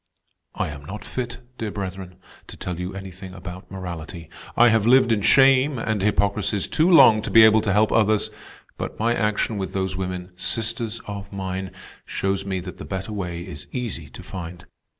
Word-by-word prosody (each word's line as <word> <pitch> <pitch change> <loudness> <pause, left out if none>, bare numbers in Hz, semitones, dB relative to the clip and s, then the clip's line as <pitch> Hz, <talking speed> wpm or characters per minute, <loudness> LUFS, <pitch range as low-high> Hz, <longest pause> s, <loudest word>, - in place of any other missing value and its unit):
"I - - -1
am 70 -1 -8
not 105 +7 -7
fit, 125 -1 -5 0.2
dear 110 - -2
brethren, 95 -2 -6 0.3
to - - -11
tell 90 -1 -5
you 90 +1 -4
anything 95 -1 -9
about 90 0 -9
morality. 85 -3 -7 0.3
I 120 +1 +7
have 110 -1 +2
lived 125 -1 +6
in 110 -2 +2
shame 135 +4 +5
and 110 -3 -1
hypocrisies 100 0 +1
too 165 +3 +2
long 115 -11 +7
to - - -4
be 115 - +8
able 110 0 +6
to 105 -2 0
help 105 +2 +3
others; 110 -1 +2 0.5
but - - -5
my 115 +2 +2
action 105 -1 0
with 95 - -4
those 95 -1 -1
women, 90 -1 -5
sisters 115 +3 -2
of 100 -1 -7
mine, 95 -1 -4 0.3
shows 95 0 -2
me 95 -1 -1
that 90 0 -9
the - - -6
better 95 +2 -4
way 90 -4 -4
is 75 - -8
easy 110 - -4
to - - -11
find. 90 -1 -8
100 Hz, 185 wpm, -23 LUFS, 95-110 Hz, 0.5 s, be